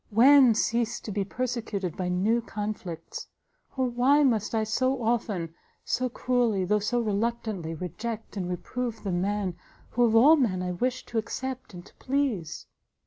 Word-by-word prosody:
when 255 +2 +7
cease 235 +1 0
to 215 - -7
be 200 0 0
persecuted 225 -5 -3
by 180 -1 -2
new 205 +6 +2
conflicts! 205 -6 -6 0.5
Oh 260 - +2
why 255 +4 +3
must 225 -5 +1
I 220 - +2
so 255 +4 0
often, 210 -8 -1 0.3
so 255 0 0
cruelly, 235 -6 +1
though 210 +3 +2
so 240 +4 0
reluctantly, 215 -6 -2
reject 215 +8 -5
and 180 -3 -3
reprove 235 +6 -4
the 195 - -2
man 190 0 -1 0.4
who 245 - +2
of 225 -1 +3
all 290 +8 +7
men 190 -10 +1
I 180 - -2
wish 250 +8 -2
to 230 - -1
accept 255 -1 -5
and 175 +1 -10
to - - -17
please!" 255 - -1
220 Hz, 160 wpm, -27 LUFS, 195-245 Hz, 0.5 s, when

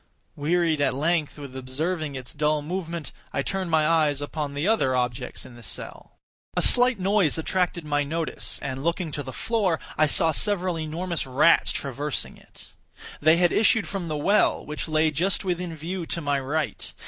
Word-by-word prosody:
Wearied 160 0 +1
at 140 - +2
length 155 +1 0
with 140 -3 -9
observing 145 +4 -2
its 130 -1 -6
dull 150 0 +1
movement, 170 -2 -4 0.2
I 140 - -1
turned 190 +1 -2
my 155 -2 +3
eyes 155 -4 +2
upon 145 0 -4
the 145 +6 -1
other 170 -13 +2
objects 125 0 -2
in 120 - -12
the 120 - -13
cell. 110 - -5 0.4
A - - +4
slight 245 -1 +5
noise 195 -4 +2
attracted 175 0 -1
my 145 -1 +1
notice, 160 +2 -3
and, 135 0 -4
looking 170 0 -1
to 145 - -3
the 130 -2 -7
floor, 200 - 0 0.2
I 155 - +5
saw 160 +2 +4
several 185 -2 +1
enormous 165 0 -3
rats 135 +6 +4
traversing 140 +1 -3
it. - - -14 0.5
They 155 +2 +5
had 175 0 +3
issued 225 0 +3
from 195 -4 -4
the 155 -1 -2
well, 200 +8 +2
which 150 +1 -4
lay 155 0 +2
just 180 +7 0
within 175 -2 -2
view 170 +2 -5
to - - -2
my 145 -3 0
right. 140 -3 -3
155 Hz, 180 wpm, -25 LUFS, 145-175 Hz, 0.5 s, slight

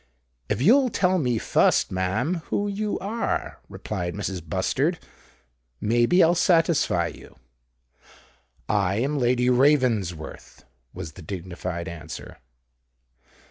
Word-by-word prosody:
"If 125 - 0
you'll 255 - +5
tell 185 -4 +1
me 125 -6 0
fust, - - +2
ma'am, 110 - -1
who 205 - -1
you 205 +1 -2
are," 215 +5 -3
replied 90 -1 -4
Mrs. 95 -3 -4
Bustard, 80 - 0 0.8
"may 120 +2 +2
be 180 +6 +5
I'll 165 - +5
satisfy 165 - +2
you." 85 - -10 1.3
"I 100 -3 +1
am 140 +6 0
Lady 125 0 +2
Ravensworth," 125 - +1 0.3
was 80 - -7
the 90 - -13
dignified 90 0 -5
answer. 80 -2 -9
120 Hz, 110 wpm, -24 LUFS, -, 1.3 s, you'll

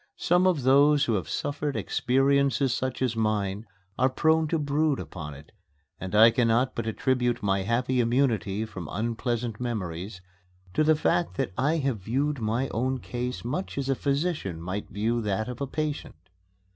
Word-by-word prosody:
Some 180 +2 +3
of 165 -8 +1
those 140 +2 +5
who 115 - 0
have 95 -4 -2
suffered 145 0 -2
experiences 135 0 +2
such 130 +1 -2
as 120 -3 0
mine 105 -1 -1 0.3
are 130 +1 +4
prone 160 +4 +2
to 165 - 0
brood 150 0 +1
upon 75 -4 -7
them, 70 +1 -12 0.5
and 95 +2 -4
I 110 +2 +8
cannot 120 +2 +2
but 115 -1 -4
attribute 120 0 0
my 95 -1 +1
happy 125 +5 0
immunity 115 -4 +1
from 95 -7 -8
unpleasant 115 +2 -2
memories 95 -5 -4 0.5
to 155 - +2
the 155 +1 +4
fact 90 - 0
that - - -1
I 150 +9 +1
have 135 -7 -1
viewed 135 +8 -1
my 115 +4 0
own 130 +3 -1
case 125 -1 -5
much 180 +9 -3
as 135 -1 -2
a 135 - +2
physician 140 - -1
might 90 +5 -5
view 115 +4 -1
that 105 0 -1
of 125 +1 -7
a 140 - -1
patient. 150 +1 -3
125 Hz, 170 wpm, -27 LUFS, 110-140 Hz, 0.5 s, I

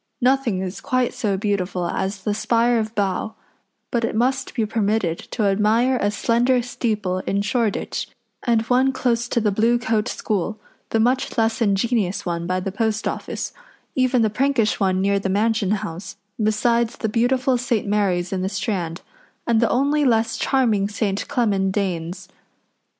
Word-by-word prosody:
Nothing 250 -7 +2
is 185 +1 -5
quite 255 -1 0
so 215 -6 -1
beautiful 190 -3 -1
as 190 +3 -3
the 210 - 0
spire 235 +2 +2
of 220 +1 -4
Bow, 200 +1 -1 0.6
but 235 -1 0
it 225 - -1
must 250 +4 0
be 225 -4 +1
permitted 210 -5 0
to 220 - -2
admire 215 +6 +3
a 205 - +2
slender 240 +4 +2
steeple 215 -6 -2
in 200 +1 +1
Shoreditch, 225 0 -1 0.3
and 230 -2 +2
one 255 +3 +2
close 240 -2 0
to 240 - 0
the 215 -2 +1
Blue 230 +4 +3
Coat 225 -2 0
School, 215 -1 -2 0.3
the 225 - +1
much 250 +4 +1
less 225 0 +1
ingenious 200 -2 +1
one 170 -1 -2
by 185 +1 0
the 190 +1 -3
Post 220 +1 -1
Office, - - -4 0.4
even 255 -2 +2
the 215 - +1
prankish 250 -2 +1
one 190 -2 +1
near 200 +1 +2
the 195 - -2
Mansion 210 +1 +1
House, 190 -3 -3 0.3
besides 230 +2 +1
the 220 - -1
beautiful 250 +4 +2
St. 240 -3 0
Mary's 195 -3 0
in 185 - -1
the 190 - -1
Strand, 190 -4 -3 0.4
and 230 -2 +3
the 230 - +3
only 285 +4 +2
less 230 -3 +2
charming 220 -7 +1
St. 205 -2 -2
Clement 195 -5 +1
Danes. 180 -3 -3
220 Hz, 165 wpm, -22 LUFS, 195-240 Hz, 0.6 s, admire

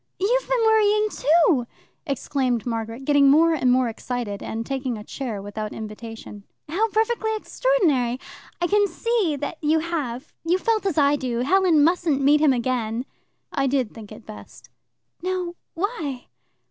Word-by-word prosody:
"You've - - +1
been - - +2
worrying 425 -1 +4
too!" 310 -5 +3 0.4
exclaimed 260 -4 -1
Margaret, 230 +2 -4
getting 285 -1 +5
more 325 +4 +5
and 260 -5 +2
more 255 0 +3
excited, 230 -2 -4
and 225 +1 -4
taking 265 -3 -3
a 210 - -8
chair 225 -5 -5
without 210 +1 -5
invitation. 220 -1 -8 0.2
"How 400 +9 0
perfectly 445 +1 0
extraordinary! 320 - +1 0.4
I 345 - +1
can 410 +3 +3
see 430 -10 0
that 290 +3 -5
you 310 +1 +3
have. 305 -5 -3
You 340 +3 +2
felt 435 0 0
as 360 - -1
I 290 0 +4
do; 245 -3 -2
Helen 345 +1 +4
mustn't 330 -3 +2
meet 285 +2 +4
him 305 -3 +5
again." 240 -1 -1 0.5
"I 275 -2 +1
did 260 -4 0
think 220 -2 -11
it 215 +1 -11
best." 215 - -12 0.5
"Now 365 -1 -2 0.2
why?" 330 - -3
285 Hz, 155 wpm, -23 LUFS, 245-365 Hz, 0.5 s, getting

